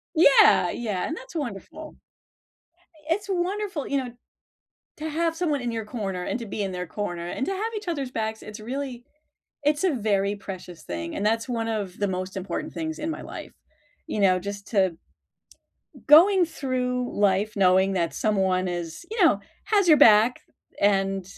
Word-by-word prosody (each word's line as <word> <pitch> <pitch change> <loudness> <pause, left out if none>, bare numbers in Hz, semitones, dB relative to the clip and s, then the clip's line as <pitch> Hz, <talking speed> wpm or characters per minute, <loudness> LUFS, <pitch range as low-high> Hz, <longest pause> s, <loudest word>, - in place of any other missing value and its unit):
Yeah. 295 -4 +6
Yeah 210 -6 -2
and 320 - -3
that's - - -11
wonderful. 295 +3 -6 1.1
It's 400 +4 -1
wonderful, 380 -3 -2
you 280 - 0
know, 250 -2 -4 0.9
to 315 +1 -4
have 330 +1 0
someone 305 -5 0
in 240 -1 -3
your 225 -1 -3
corner 200 -5 -4
and - - -2
to 230 - -7
be 205 +1 -4
in 190 -1 -3
their 180 -1 -4
corner 175 -2 -4
and 265 - -3
to 390 - -1
have 440 +4 -3
each 415 -3 -6
other's 280 -6 -2
backs. 220 -2 -3
It's 215 +1 -9
really 250 +1 -5 0.6
it's 295 +3 +1
a 360 -6 +3
very 200 -2 0
precious 185 -3 -9
thing, 85 -1 -5
and 205 - -2
that's 225 +3 +1
one 230 -2 -1
of 205 -4 -3
the 205 - 0
most 185 +1 -4
important 190 +2 -4
things 320 0 -4
in 315 - -3
my 315 - -4
life. - - -9 0.5
You 210 - -4
know, 185 -2 +4
just 200 +1 -7
to 190 -6 +1 1.1
going 360 +5 +8
through 250 -5 -2
life 205 +1 +2
knowing 190 0 +4
that 170 -3 -1
someone 190 -3 +1
is 175 - -5
you 440 -5 +2
know, 205 -12 +5 0.3
has 405 -4 +2
your 310 - +8
back 225 0 +6 0.4
and 195 -1 +2
225 Hz, 175 wpm, -25 LUFS, 195-305 Hz, 1.1 s, going